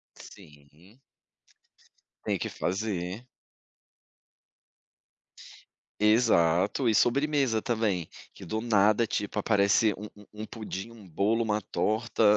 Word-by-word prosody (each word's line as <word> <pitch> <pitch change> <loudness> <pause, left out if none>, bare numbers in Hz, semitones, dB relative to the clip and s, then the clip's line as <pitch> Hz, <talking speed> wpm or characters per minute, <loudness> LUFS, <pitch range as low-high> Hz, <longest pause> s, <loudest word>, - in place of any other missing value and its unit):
Sim. 75 - -17 1.2
Tem - - -1
que - - -3
fazer. 95 +2 -3 2.7
Exato 105 -1 +3
e 110 - +2
sobremesa 135 0 +2
também 110 -8 -1 0.2
que - - -12
do 110 +5 -3
nada 110 0 +3
tipo 105 -1 -3
aparece 105 +1 +3
um 105 - -7
um 105 - -15 0.2
um - - -5
pudim, 110 -1 -7
um 110 -5 -15
bolo, 105 +7 +1
uma 105 -2 0
torta 110 +3 -1
105 Hz, 100 wpm, -28 LUFS, 95-115 Hz, 2.7 s, Exato